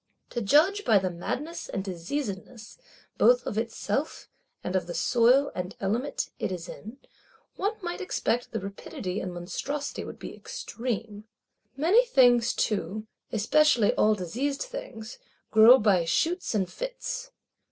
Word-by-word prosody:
To 240 - -2
judge 325 - +4
by 215 - +5
the 185 -1 0
madness 290 - -5
and 195 - -3
diseasedness 205 - -5 0.4
both - - +5
of - - -3
itself, 230 +4 -2 0.3
and 180 - -3
of 185 - 0
the 175 - -5
soil 245 - +4
and 180 +1 -5
element 245 +6 -2
it - - -2
is 175 -2 -5
in, 220 +5 -9 0.6
one 410 +3 -1
might 350 +2 -4
expect 245 -9 -1
the 225 - -2
rapidity 200 - -5
and 185 - -4
monstrosity 195 +12 -4
would - - -8
be - - -8
extreme. 225 -3 -5 0.5
Many 365 - +5
things 245 - +4
too, 210 0 -1 0.3
especially 235 +1 +3
all 215 0 +3
diseased 250 - -2
things, 370 - -8 0.3
grow 225 +4 +9
by 200 -7 +3
shoots 330 - 0
and 190 -3 +1
fits. - - -5
230 Hz, 140 wpm, -27 LUFS, 195-295 Hz, 0.6 s, grow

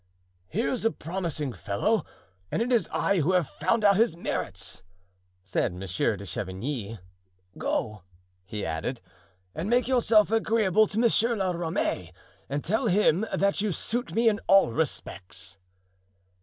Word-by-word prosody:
"Here's 230 - -1
a 225 - +4
promising 160 - -4
fellow 205 - 0 0.5
and - - 0
it 250 - -3
is 235 -3 +2
I 200 - +1
who 165 +4 +2
have 180 -5 +2
found 210 +10 0
out 200 -2 +6
his 225 -6 +3
merits," 95 - -3 0.6
said 90 -1 -1
Monsieur 90 -1 -1
de - - -8
Chavigny. 110 +3 -4 0.6
"Go," 105 -3 -2 0.4
he 105 +3 -5
added, 80 +11 -3 0.5
"and 170 +6 -3
make 245 +1 +3
yourself 225 -5 +4
agreeable 220 -2 +3
to 205 - -5
Monsieur 235 0 +3
la 190 -3 0
Ramee, 165 - -2 0.4
and 140 +1 -2
tell 220 +7 0
him 205 0 +3
that 200 0 +1
you 210 -1 0
suit 240 +8 -2
me 230 +1 +3
in 215 -1 +3
all 195 -10 +6
respects." 100 - -3
185 Hz, 145 wpm, -27 LUFS, -, 0.6 s, out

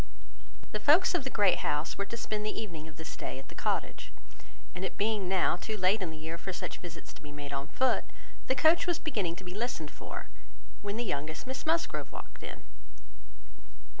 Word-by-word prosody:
The - - -1
folks 320 +6 +6
of 350 -6 +2
the - - 0
Great 200 -7 +5
House 150 +2 0
were 200 - -2
to 235 - -4
spend 215 -2 -1
the 215 - -1
evening 165 -8 -5
of 155 - -11
this 160 -1 -6
day - - -4
at 135 - -10
the - - -9
Cottage; - - -1 0.6
and 185 - -4
it 190 - -2
being 205 -3 +2
now 185 -2 +4
too 215 +4 -3
late 195 +3 +4
in 180 - 0
the 160 - -7
year 160 +2 -4
for 190 - -3
such 180 - -4
visits 170 -2 -8
to - - -14
be 150 - -9
made 145 -1 -6
on 140 +1 -2
foot, 260 - +3 0.4
the 260 - +3
coach 320 +6 +6
was 350 -2 +3
beginning 210 - 0
to 185 - -9
be 180 0 -6
listened 210 -8 -2
for, - - -6 0.5
when 205 +1 -2
the 240 - +1
youngest 155 -2 -2
Miss 260 +3 -4
Musgrove 330 +1 +1
walked - - -8
in. - - -7
190 Hz, 210 wpm, -32 LUFS, 160-235 Hz, 0.6 s, folks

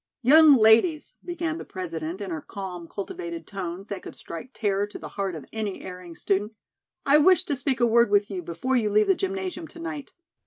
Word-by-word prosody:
"Young 300 +3 +8
ladies," 230 +8 +4
began 340 -2 -3
the - - -6
President 170 0 -5
in 195 -3 -5
her 160 -2 -4
calm, 180 -3 -7
cultivated 340 - -6
tones 190 -1 -6
that 200 -2 -5
could - - -10
strike 170 +9 -8
terror 205 -3 0
to 205 - -9
the - - -8
heart 195 -3 -3
of 150 -4 -8
any 215 -3 -4
erring 180 -2 -9
student, 205 +5 -1 0.5
"I 285 +2 +6
wish 370 +4 +5
to 290 - -2
speak 265 -1 -1
a 240 - +4
word 235 0 +4
with 205 0 +3
you 185 -2 -3
before 175 +11 -2
you 220 -4 +2
leave 210 +1 +4
the - - +4
gymnasium 375 -3 -4
to 335 - -14
night. 320 -4 -6
215 Hz, 205 wpm, -25 LUFS, 190-310 Hz, 0.5 s, Young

